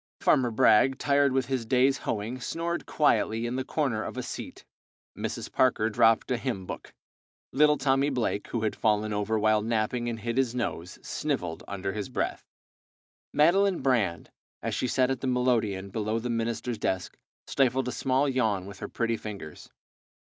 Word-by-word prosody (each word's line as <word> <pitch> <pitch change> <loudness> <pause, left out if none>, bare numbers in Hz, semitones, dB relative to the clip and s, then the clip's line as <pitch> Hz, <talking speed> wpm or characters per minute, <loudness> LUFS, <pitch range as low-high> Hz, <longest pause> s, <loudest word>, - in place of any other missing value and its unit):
Farmer 125 -2 +3
Bragg, 115 +3 +4
tired 140 -1 +3
with 130 0 +1
his 130 -3 -2
day's 130 +3 +2
hoeing, 115 +4 -3
snored 170 +3 -3
quietly 115 -6 +2
in 120 +1 -2
the 130 - -1
corner 130 -6 -1
of - - -6
a - - -2
seat. - - -7 0.5
Mrs. - - -4
Parker 115 -3 +2
dropped 115 +2 +3
a 125 - +2
hymn 115 -7 -3
book. - - -7 0.6
Little 150 +2 +5
Tommy 135 +1 +2
Blake, 120 -6 -1
who 115 -2 -3
had 110 - 0
fallen 105 -1 +1
over 105 +2 0
while 110 0 +3
napping 115 +2 -1
and 115 -1 -4
hit 115 +2 -3
his 130 -2 +1
nose, 95 -7 -3
snivelled 110 - -3
under 95 -1 -4
his 105 +1 -4
breath. 125 - -3 0.8
Madeline 185 +5 +3
Brand, 110 - 0 0.3
as - - -2
she 125 - -1
sat 130 +1 +2
at 130 - -3
the 135 - -2
melodeon 115 -6 0
below 110 +2 -1
the 120 +1 -3
minister's 115 0 -2
desk, 95 -3 -2 0.3
stifled 130 -1 +1
a - - -1
small 135 +3 +1
yawn 110 -8 0
with 100 -1 -10
her - - -5
pretty 115 -1 -1
fingers. 100 -9 -8
120 Hz, 170 wpm, -28 LUFS, 110-130 Hz, 0.8 s, Little